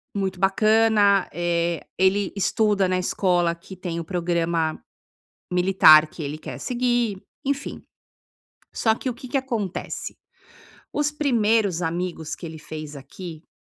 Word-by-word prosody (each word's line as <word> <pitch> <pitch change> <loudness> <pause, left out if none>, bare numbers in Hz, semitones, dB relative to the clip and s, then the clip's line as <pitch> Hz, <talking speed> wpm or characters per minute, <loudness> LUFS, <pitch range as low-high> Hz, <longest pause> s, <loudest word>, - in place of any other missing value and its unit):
Muito 190 -2 -2
bacana, 210 0 +4
eh, 170 0 -1
ele 190 +1 +2
estuda 205 -1 +2
na 185 0 +1
escola 175 -2 +1
que 185 +2 -12
tem 170 -2 -4
o 165 - -5
programa 170 -2 0 0.7
militar 180 -4 +6
que 155 - -9
ele 145 +1 -4
quer 155 - -8
seguir, 240 -5 0 0.2
enfim. 280 +1 -3 0.9
Só 220 -1 +2
que, 255 - -4
o - - -3
que 255 +2 -10
que 275 - 0
acontece? 230 -8 -4 0.8
Os 295 0 +1
primeiros 225 - +1
amigos 170 -1 -3
que 170 - -8
ele 160 0 -8
fez 155 -1 -7
aqui, 155 +4 -9
hã, - - -41
185 Hz, 135 wpm, -24 LUFS, 170-220 Hz, 0.9 s, militar